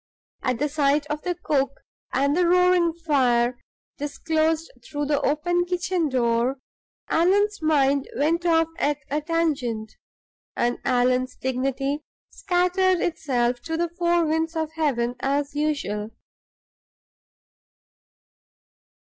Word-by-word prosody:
At 255 -2 0
the 295 +5 0
sight 290 0 +1
of 300 0 -2
the 355 -1 -2
cook 280 -5 -1 0.3
and 280 +2 +1
the 355 0 +3
roaring 360 -1 +4
fire, 255 -7 +1 0.4
disclosed 315 +2 -1
through 290 +2 -3
the 290 0 +1
open 350 +5 +1
kitchen 355 -2 -1
door, 240 0 +1 0.5
Allan's 405 +4 +2
mind 280 -3 +2
went 325 +5 +1
off 325 -1 +3
at 290 0 +1
a 300 +1 0
tangent, 280 -9 -1 0.6
and 240 0 0
Allan's 255 0 +1
dignity 270 +2 -1 0.3
scattered 365 0 +1
itself 250 -8 0
to 325 +3 -3
the 345 0 0
four 345 0 +1
winds 320 +1 -1
of 315 -1 -2
heaven, 270 -7 0
as 280 +1 -1
usual. 285 -9 -2
300 Hz, 115 wpm, -24 LUFS, 265-335 Hz, 0.6 s, roaring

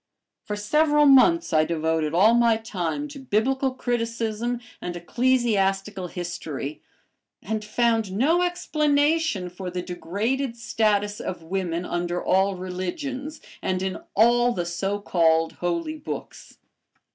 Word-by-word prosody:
For 210 - -3
several 295 +8 +3
months 285 - +5
I 155 0 +5
devoted 160 -1 0
all 195 +7 +5
my 235 -1 +4
time 220 - -3
to 285 -1 -9
Biblical 265 +2 +1
criticism 235 -2 -2 0.2
and 175 -1 -4
ecclesiastical 195 -2 0
history, 155 -5 -5 0.6
and 215 +2 -3
found 225 -1 +1
no 290 - +2
explanation 305 - +1
for 180 +1 -6
the 180 0 -4
degraded 225 +9 -2
status 210 -3 0
of 180 -3 -5
women 175 0 -2
under 175 0 -2
all 190 +1 +2
religions, 255 - -5 0.2
and 185 0 -1
in 190 -1 -3 0.2
all 240 +3 +4
the 175 -4 -2
so 195 +4 -2
called 165 -4 +2
"Holy 175 - -2
Books." - - -8
210 Hz, 120 wpm, -24 LUFS, 180-255 Hz, 0.6 s, months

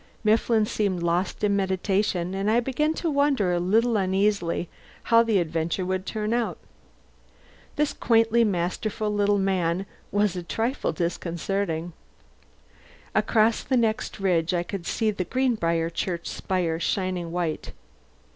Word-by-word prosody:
Mifflin 220 0 +3
seemed 195 -5 -1
lost 170 +4 -1
in 205 -1 +3
meditation, 190 -1 0
and 195 +2 -1
I 225 +2 +4
began 300 +6 0
to 335 - -1
wonder, 280 -10 +2
a 175 - +1
little 220 +6 +2
uneasily, 190 -2 +1 0.4
how 230 -1 +5
the 225 -3 +2
adventure 165 +1 -1
would 185 +1 -2
turn 215 0 -2
out. 235 -1 -1 1.2
This 300 -1 +1
quaintly 230 0 +3
masterful 210 +2 -1
little 205 0 +2
man 190 -2 0 0.3
was 205 -2 +1
a 180 - -3
trifle 225 - -1
disconcerting. 170 0 -2 1.2
Across 220 0 +2
the 260 - +1
next 220 -3 0
ridge 180 -2 +1
I 175 - 0
could 175 -1 -6
see 220 -2 +1
the 200 -3 -3
Greenbriar 170 -9 0
church 170 -1 -3
spire 175 -4 -1
shining 180 -1 -1
white. 170 -3 -2
195 Hz, 135 wpm, -25 LUFS, 175-220 Hz, 1.2 s, how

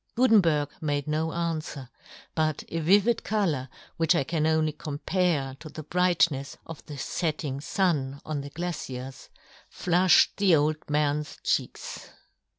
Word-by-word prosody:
Gutenberg 180 - +4
made 145 -2 -1
no 155 +1 0
anfwer, 160 -5 -3 0.5
but 155 -2 0
a 165 - -2
vivid 200 +8 +3
colour, 165 -12 0 0.3
which 165 -2 +3
I - - +2
can 155 +2 0
only 160 -1 +2
com 150 -1 -6
pare 155 -7 0
to 155 - -9
the 155 - -8
brightnefs 170 -4 +1
of 165 -2 -9
the 145 - -7
fetting 150 -3 -2
fun 150 -7 0
on 155 -2 -3
the 140 - -7
glaciers, 135 -6 -6 0.4
flufhed 180 +1 +4
the 195 -4 +5
old 155 +1 0
man's 150 0 0
cheeks. - - -2
155 Hz, 140 wpm, -27 LUFS, 145-175 Hz, 0.5 s, the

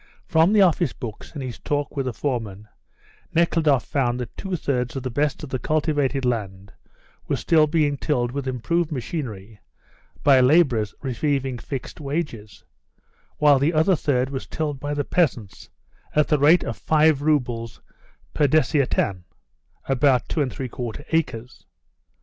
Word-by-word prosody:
From 160 +3 +3
the 210 -2 +6
office 170 -5 +2
books 115 -5 -8
and 145 -4 -5
his 125 -2 -6
talk 145 0 -2
with 135 -2 -2
the - - 0
foreman, 110 -5 -4 0.7
Nekhludoff 160 -5 +2
found 125 -4 0
that 120 -3 -6
two 190 -2 -4
thirds 125 -6 -2
of 135 - -4
the 130 - -3
best 145 +4 -1
of 150 - -6
the 130 - -2
cultivated 145 -3 0
land 100 -5 -3 0.5
was - - -1
still 155 -2 +4
being 150 -2 +1
tilled 125 -6 -1
with 140 0 -4
improved 155 +7 -1
machinery 115 - -5 0.6
by 140 -2 +6
labourers 125 -6 +3
receiving 135 -1 -1
fixed 135 +4 -7
wages, 140 -8 -5 0.7
while 145 -2 +5
the 150 +5 +1
other 160 +5 +4
third 130 -4 0
was 135 - -5
tilled 150 -3 -3
by 145 +1 -3
the 145 - -1
peasants 125 - -1 0.5
at 150 0 +3
the 150 - +3
rate 155 +5 +5
of 115 - -5
five 155 +4 +3
roubles 120 -7 -1 0.5
per 145 - +3
desiatin 135 - +1 0.6
[about 135 -1 +2
two 155 - -1
and 135 -3 -1
three 130 - -5
quarter 125 +3 -6
acres]. 130 -7 -2
140 Hz, 155 wpm, -23 LUFS, 125-150 Hz, 0.7 s, the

